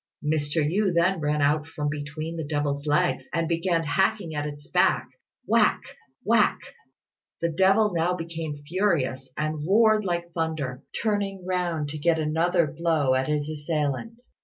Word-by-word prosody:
Mr. 150 0 +1
Yü 195 +4 +1
then 170 +2 +3
ran 150 -1 0
out 150 +2 +2
from 155 -2 -4
between 155 +2 -4
the 160 - -3
devil's 145 -1 -2
legs, 175 +5 +1
and 165 -1 0
began 170 0 0
hacking 190 +3 0
at 145 0 -2
its 145 0 -9
back - - +2 0.4
whack! - - +3 0.4
whack! 225 -1 +3 0.8
The 170 - 0
devil 195 +5 +3
now 170 +2 +1
became 165 -4 -5
furious, 155 -8 0
and 155 0 -2
roared 215 +4 +4
like 175 -2 -2
thunder, 155 -6 -3 0.2
turning 200 -4 -1
round 175 -5 -1
to 155 +1 -6
get 165 +2 +2
another 165 +3 +2
blow 155 -3 +1
at 130 0 +1
his 150 -1 -1
assailant. 155 - -3
160 Hz, 150 wpm, -26 LUFS, 150-180 Hz, 0.8 s, roared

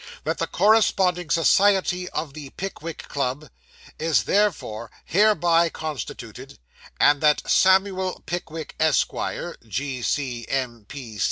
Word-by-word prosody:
'That - - -2
the - - -1
Corresponding 190 -5 +2
Society 180 +1 +3
of 150 -3 -4
the 145 -2 -9
Pickwick 170 -4 -6
Club 140 +1 -3 0.5
is 160 -1 +2
therefore 155 - 0 0.2
hereby 175 -3 +3
constituted; 155 -3 -7 0.4
and 145 -1 +4
that 150 -1 +2
Samuel 190 0 +2
Pickwick, 165 -2 -5
Esq., 160 -1 +2 0.6
G.C.M. 125 -1 -3
160 Hz, 95 wpm, -23 LUFS, 140-185 Hz, 0.6 s, and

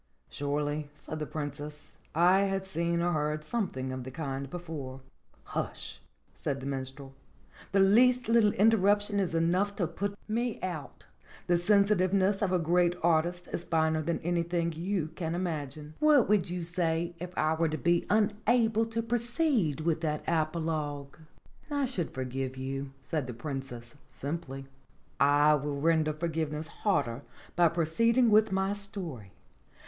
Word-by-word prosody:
"Surely," 145 +1 -2
said 155 +1 -7
the 150 - -3
Princess, 150 0 -6 0.2
"I 180 +4 +5
have 195 -1 -1
seen 170 -2 -1
or 155 -4 +1
read 150 0 -4
something 155 - -2
of 130 -1 -5
the 130 - -7
kind 135 -1 -4
before." 145 -6 -6 0.4
"Hush - - -5 0.2
!" - - -39
said 140 -1 -3
the 135 - -8
Minstrel. 135 0 -5 0.6
"The 195 0 +4
least 245 +5 +5
little 225 -2 +5
inter 225 +3 +5
ruption 205 +1 +2
is 180 -4 -1
enough 180 +5 +1
to 180 - 0
put 200 +5 -3
me 235 +1 -1
out. 155 -8 -5 0.4
The 175 - +3
sensitiveness 195 +1 +3
of 200 -3 +1
a 185 - +3
great 175 +1 +2
artist 175 +2 +1
is 170 - -2
finer 160 -2 +1
than 170 +2 -1
anything 170 0 0
you 170 0 -2
can 165 0 -4
imagine. 155 -4 -4
What 300 -5 +5
would 205 -4 +2
you 175 0 -3
say 170 0 -1
if 180 +1 -7
I 155 +1 +2
were 160 0 +1
to 155 - -2
be 170 +1 +1
unable 220 +2 +2
to 225 0 -2
proceed 235 - +1
with 160 0 0
that 150 -2 -1
apologue 155 -3 -2 0.3
?" - - -28
"I 285 -2 +1
should 195 -10 -2
forgive 130 0 -4
you," 135 +1 -4
said 150 -5 -2
the 125 - -6
Princess 130 -3 -6 0.2
simply. 140 -2 -5 0.5
"I 145 +2 +5
will 145 -1 -1
render 160 0 +3
forgiveness 155 -1 -3
harder 125 - +1 0.3
by 175 0 +5
proceeding 225 +9 +2
with 215 0 +5
my 190 +1 +1
story. 180 - -6
170 Hz, 155 wpm, -30 LUFS, 150-195 Hz, 0.6 s, I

